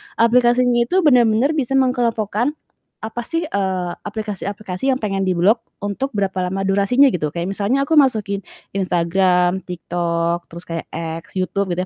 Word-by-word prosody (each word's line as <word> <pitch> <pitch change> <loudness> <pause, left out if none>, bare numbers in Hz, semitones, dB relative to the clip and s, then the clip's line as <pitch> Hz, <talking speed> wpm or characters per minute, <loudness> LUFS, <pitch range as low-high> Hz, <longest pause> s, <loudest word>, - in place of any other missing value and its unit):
aplikasinya 240 +1 +3
itu 370 +5 +2
bener-bener 245 -2 +4
bisa 270 -4 -1
mengelompokkan 245 -1 +1 0.4
apa 225 +2 -5
sih, 330 +5 -2
eee, 190 - -1
aplikasi-aplikasi 210 +1 -3
yang 260 - 0
pengen 195 -4 -1
diblok 190 +5 +2 0.2
untuk 205 +7 -3
berapa 195 -3 -1
lama 195 +2 -2
durasinya 200 +8 +4
gitu. 155 - -1
Kayak 170 +2 -3
misalnya 235 +8 +1
aku 320 - +2
masukin 215 -9 +2 0.3
Instagram, 180 0 +1
TikTok, 170 -1 -2
terus 170 +1 -9
kayak 165 -1 -4 0.4
X, 190 - -6
YouTube, 190 +1 -1
gitu - - -4
200 Hz, 140 wpm, -20 LUFS, 185-245 Hz, 0.4 s, bener-bener